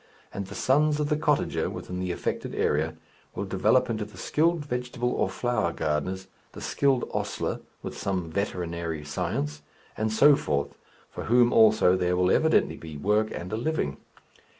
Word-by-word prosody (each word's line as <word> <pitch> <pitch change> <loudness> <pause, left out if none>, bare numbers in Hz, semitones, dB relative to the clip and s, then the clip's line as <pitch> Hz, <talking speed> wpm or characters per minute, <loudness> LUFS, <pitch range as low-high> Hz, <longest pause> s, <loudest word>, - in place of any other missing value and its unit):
And 100 -1 -4
the 100 - -9
sons 150 +3 +2
of 150 -1 0
the 150 - +2
cottager 150 -1 +1
within 90 0 -6
the 90 -1 -2
affected - - -3
area 80 +2 +1 0.4
will - - -3
develop - - +2
into 110 -2 -2
the 105 0 -12
skilled 165 0 +1
vegetable 125 -2 -2
or - - 0
flower 120 -9 0
gardeners, 85 +4 -2 0.3
the - - -9
skilled 135 -3 +1
ostler - - -2 0.2
with - - -5
some 90 -4 -2
veterinary 85 -4 -3
science 75 0 -3 0.3
and 110 0 -1
so 140 +7 +6
forth, 70 - -1 0.4
for - - -6
whom 120 +1 +4
also 110 -4 +6
there 90 -1 +1
will 90 0 +3
evidently - - +3
be 80 -2 -8
work 105 +7 +1
and 90 +4 -6
a - - 0
living. 120 - -1
100 Hz, 165 wpm, -27 LUFS, 85-125 Hz, 0.4 s, so